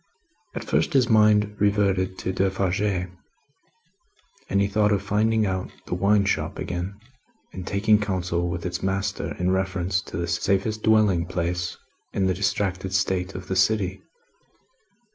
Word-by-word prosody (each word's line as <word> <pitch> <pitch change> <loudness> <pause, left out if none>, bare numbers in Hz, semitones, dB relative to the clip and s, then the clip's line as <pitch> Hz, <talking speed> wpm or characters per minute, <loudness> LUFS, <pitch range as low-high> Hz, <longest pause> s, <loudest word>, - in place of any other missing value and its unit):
At - - -4
first, - - 0
his 130 -4 +3
mind 105 -1 +4
reverted 100 -2 +1
to 95 - -3
Defarge, 95 0 0
and 105 - -7
he 100 - +3
thought 105 +1 +2
of 100 -1 +1
finding 110 +2 +2
out 95 -1 -2 0.2
the - - -4
wine 100 +2 +3
shop 100 - -1
again 90 +3 -4 0.6
and 95 -1 -7
taking 105 +1 +3
counsel 90 -4 -1
with 85 -1 -4
its 90 0 -3
master 95 +1 -2
in 90 +1 +1
reference 95 -1 0
to - - -8
the 85 - -1
safest 100 +5 0
dwelling 105 -6 +3
place 85 -1 -2 0.4
in 95 - +1
the 95 - +2
distracted 95 -1 -1
state 95 -1 0
of 95 +1 -7
the 95 - -2
city. 95 0 +1
95 Hz, 145 wpm, -24 LUFS, 90-105 Hz, 0.6 s, mind